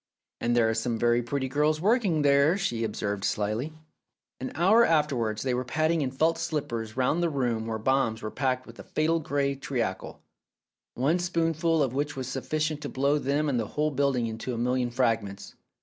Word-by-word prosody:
"And 120 0 0
there 115 -2 +4
are 110 - +1
some 115 +1 -1
very 120 +1 +2
pretty 130 +2 -2
girls 150 +3 +1
working 195 - +2
there," 140 +5 +4
she 120 - -1
observed 100 -2 -3
slyly. 110 +10 -1 0.7
An 130 - -4
hour 205 +8 +5
afterwards 135 - +1
they 130 -2 0
were 125 +1 -1
padding 155 +5 +1
in 135 - 0
felt 160 +5 +1
slippers 115 -7 -3
round 130 +6 +1
the 170 - +2
room 120 -6 -1
where 110 -1 -2
bombs 115 -1 0
were 110 - -4
packed 130 -2 -1
with 115 -2 -14
a - - -8
fatal 160 +7 0
grey 140 -2 0
treacle, 120 -8 -4 0.7
one 145 +8 +1
spoonful 165 -2 +1
of 130 -3 -2
which 145 +2 -2
was 130 -2 -4
sufficient 150 +3 -2
to - - -4
blow 140 +3 +1
them 145 +2 0
and 130 -4 +1
the 110 - -2
whole 150 +1 +2
building 140 -3 +1
into 115 +2 -4
a - - -5
million 125 +1 0
fragments. 115 -5 -1
135 Hz, 190 wpm, -27 LUFS, 115-155 Hz, 0.7 s, hour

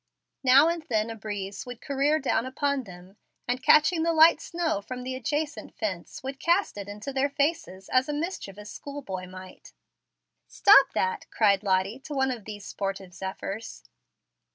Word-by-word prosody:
Now 270 +4 +7
and 335 0 -1
then 220 -1 0
a - - -6
breeze 200 -1 -6
would 245 -1 -7
career 285 +2 +1
down 255 -4 0
upon 280 0 -1
them, 185 +1 -13 0.3
and, 250 +1 -1
catching 310 +5 +5
the 335 +1 +2
light 320 0 +6
snow 335 -11 -2
from 250 +4 -7
the 255 +1 -4
adjacent 295 +4 -3
fence, 190 -3 -5
would 270 0 -5
cast 345 +6 +2
it 200 -1 -7
into 210 +7 -6
their 275 +1 +1
faces 280 - -2
as 255 +2 +2
a - - -1
mischievous 210 - -5
school 285 0 -8
boy 185 -3 -5
might. 185 0 -12 0.7
"Stop 410 +1 +6
that!" 465 -2 -1
cried 200 -3 +3
Lottie 195 +3 0
to 290 +2 -7
one 265 -1 +2
of 230 -5 -6
these 205 -2 -8
sportive 195 -2 -5
zephyrs. 195 +3 -6
255 Hz, 170 wpm, -27 LUFS, 200-290 Hz, 0.7 s, Now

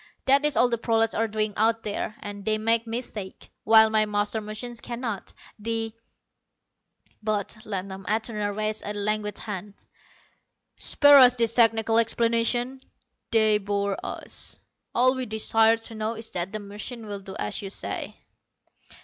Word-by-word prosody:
That 275 +2 +5
is 300 - +1
all 245 - +5
the 235 -2 -2
prolats 225 -1 +2
are 225 +1 +1
doing 215 -1 -2
out 225 +1 +2
there, 210 +1 -3
and 205 -1 -7
they 215 +1 +1
make 230 +1 +1
mistakes, 225 -4 -6 0.2
while 220 0 +7
my 215 -1 +3
master 210 +1 -1
machine 215 +3 -6
cannot. 235 -3 -5 0.3
The 225 0 -3 0.6
" - - -39
But 215 -1 -1
Ladnom 195 -1 -5
Atuna 215 -1 -1
raised 215 0 -1
a 210 - -4
languid 210 0 -1
hand. 205 -1 -6 1.0
"Spare 285 -1 +6
us 250 -1 +7
these 230 -2 0
technical 225 -1 +4
explanations. 235 +3 +1 0.5
They 220 -2 +4
bore 200 0 -1
us. - - -4 0.4
All 255 +2 +4
we 260 -1 -4
desire 220 +1 +3
to 225 0 -7
know 220 +1 -3
is 225 0 -9
that 175 +2 -3
the 215 - -3
machine 210 +3 -7
will 205 -1 -5
do 190 0 -10
as 105 - -3
you 195 - -6
say." - - -4
220 Hz, 155 wpm, -25 LUFS, 210-230 Hz, 1.0 s, while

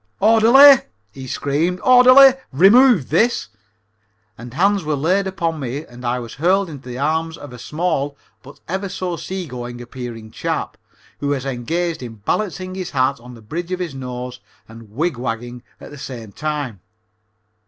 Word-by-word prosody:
"Orderly," 230 +7 +7 0.3
he 130 +3 -9
screamed. 155 +8 -1
"Orderly, 255 +1 +8 0.2
remove 195 - +5
this." 220 - +1 0.9
And 120 +1 -10
hands 195 +3 +2
were 155 -1 -1
laid 185 +7 +1
upon 165 -4 -2
me 135 +3 -5
and 120 +1 -14
I 120 +1 -1
was 120 -2 -7
hurled 185 +4 +1
into 135 -3 -10
the 125 - -6
arms 160 +3 -1
of 145 -3 -11
a 125 - -10
small, 150 -2 -2 0.2
but 140 - -15
ever 190 +3 -3
so 185 -2 -4
sea 185 +2 -5
going 120 -3 -7
appearing 120 -2 -8
chap, - - -3 0.4
who 145 - -3
was 140 -2 -1
engaged 160 +7 -2
in 120 -3 -8
balancing 185 - -3
his 185 -2 -5
hat 135 0 0
on 125 +1 -12
the 115 - -15
bridge 170 +10 -6
of 185 - -2
his 175 -5 -4
nose 125 -1 -7 0.3
and 115 -1 -13
wig 150 +6 -2
wagging 120 0 -5 0.2
at - - -12
the 145 - -11
same 115 -6 -8
time. 145 -6 -4
145 Hz, 165 wpm, -19 LUFS, 125-185 Hz, 0.9 s, Orderly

